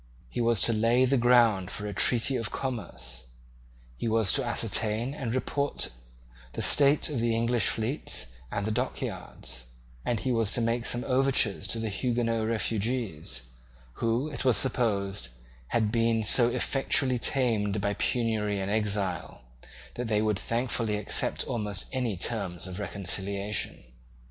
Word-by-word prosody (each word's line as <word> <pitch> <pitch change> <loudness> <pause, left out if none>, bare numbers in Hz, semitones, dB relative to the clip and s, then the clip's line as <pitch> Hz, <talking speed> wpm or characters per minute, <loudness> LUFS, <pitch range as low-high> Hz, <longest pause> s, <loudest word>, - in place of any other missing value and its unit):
He - - -2
was 115 -3 +2
to 115 - +5
lay 115 +4 +3
the 135 +2 +2
ground 120 -6 +4
for 105 - -5
a 105 - -4
treaty 120 +6 +2
of 115 -4 -2
commerce; 100 - -4 0.7
he - - -3
was 110 -3 +2
to 135 - +1
ascertain 115 +1 0
and 130 -5 -3
report 140 +2 -1 0.6
the - - -1
state 145 +1 +5
of 140 - -1
the 115 0 +1
English 115 +1 +2
fleets 115 - 0 0.3
and 105 +2 -2
dockyards; 65 - -4 0.4
and 120 - -1
he 130 - -1
was 115 -4 +2
to - - +1
make 115 +1 0
some 120 0 +2
overtures 130 -7 +1
to 115 - -2
the 110 -1 -2
Huguenot 115 0 -1
refugees, 110 - -1 0.5
who, 115 +5 0
it 150 - -4
was 130 -3 +4
supposed, 100 - +1 0.4
had 110 - +1
been 115 -1 +2
so 120 +3 +5
effectually 130 0 +1
tamed 110 -6 +1
by 100 +1 0
penury 110 -3 -1
and 95 +1 -2
exile, 100 - -1 0.5
that 120 -1 -4
they 105 -1 +1
would 105 -3 0
thankfully 115 -1 -1
accept 105 - +1
almost 105 -5 -2
any 125 -7 -2
terms 90 -4 -2
of 95 +1 -6
reconciliation. 100 +1 -2
115 Hz, 145 wpm, -28 LUFS, 105-125 Hz, 0.7 s, to